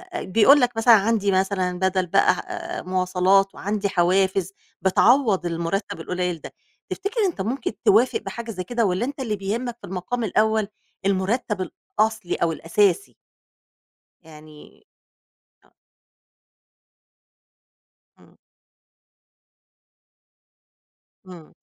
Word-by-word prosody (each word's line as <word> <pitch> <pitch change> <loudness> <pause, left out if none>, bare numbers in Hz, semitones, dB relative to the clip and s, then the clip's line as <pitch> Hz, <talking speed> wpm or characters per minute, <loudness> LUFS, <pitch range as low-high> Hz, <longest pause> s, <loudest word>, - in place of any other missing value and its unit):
بيقول 225 +9 +4
لَك 245 -2 0
مثلًا 230 +1 +6
عندي 205 -1 +2
مثلًا 185 -1 0
بدل 190 -1 +1
بقى - - +4 0.5
آآ - - -6
مواصلات، 185 +1 +1
وعندي 205 0 -2
حوافز 190 +1 +1 0.3
بتعوض 210 0 +3
المرتب 170 +3 -3
القليل 180 -2 -3
ده، - - -10 0.4
تفتكر 410 +4 -4
أنت 345 - -2
ممكن 235 +6 -2
توافق 230 +5 +4
بحاجة 235 -1 -7
زي 185 -3 -5
كده 235 +3 -1
والّا 185 +5 0
أنت 280 +1 -6
اللي 225 -5 -2
بيهمك 230 +5 -4
في 200 - -9
المقام 190 +6 -4
الأول 220 0 +1 0.4
المرتب 195 +1 -1 0.3
الأصلي 220 -4 +1
أو 165 -1 0
الأساسي؟ 200 - 0 1.1
يعني 155 -1 -16 0.8
آه. - - -31 2.5
امم. - - -22 2.9
امم. 175 -4 -13
195 Hz, 100 wpm, -23 LUFS, 185-225 Hz, 2.9 s, مثلًا